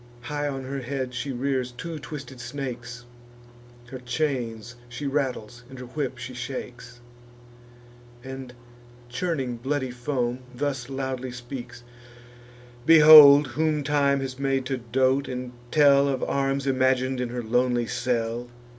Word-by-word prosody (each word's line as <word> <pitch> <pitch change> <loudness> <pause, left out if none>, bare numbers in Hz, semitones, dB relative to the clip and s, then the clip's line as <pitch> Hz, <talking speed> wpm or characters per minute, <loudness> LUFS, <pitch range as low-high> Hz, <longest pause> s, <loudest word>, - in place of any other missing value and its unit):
High 145 +3 -3
on 135 -2 -4
her 135 +1 -4
head 130 0 -4
she 135 +3 -4
rears 130 0 -2
two 160 +6 -7
twisted 135 -1 -9
snakes, 125 -2 -6 0.9
Her 130 - -6
chains 120 -4 -3
she 125 +4 -6
rattles, 130 -5 -2
and 130 - -11
her 125 - -8
whip 130 0 -4
she 125 +1 -7
shakes; 125 -1 -7 1.2
And, 130 -1 -8 0.6
churning 130 -3 -2
bloody 130 +1 -2
foam, 125 -1 -2 0.2
thus 135 -2 -3
loudly 130 -1 -4
speaks: 125 0 -8 1.0
"Behold 150 -1 +9
whom 150 +3 0
time 140 -1 +2
has 130 -1 -5
made 135 -1 0
to 135 0 -2
dote, 130 +3 +1
and 125 0 -5 0.2
tell 140 -1 +5
Of 135 -2 -1
arms 135 0 -1
imagin'd 130 -1 +1
in 125 - -2
her 120 0 -4
lonely 120 +1 +1
cell! 120 -1 -2
130 Hz, 130 wpm, -25 LUFS, 125-140 Hz, 1.2 s, Behold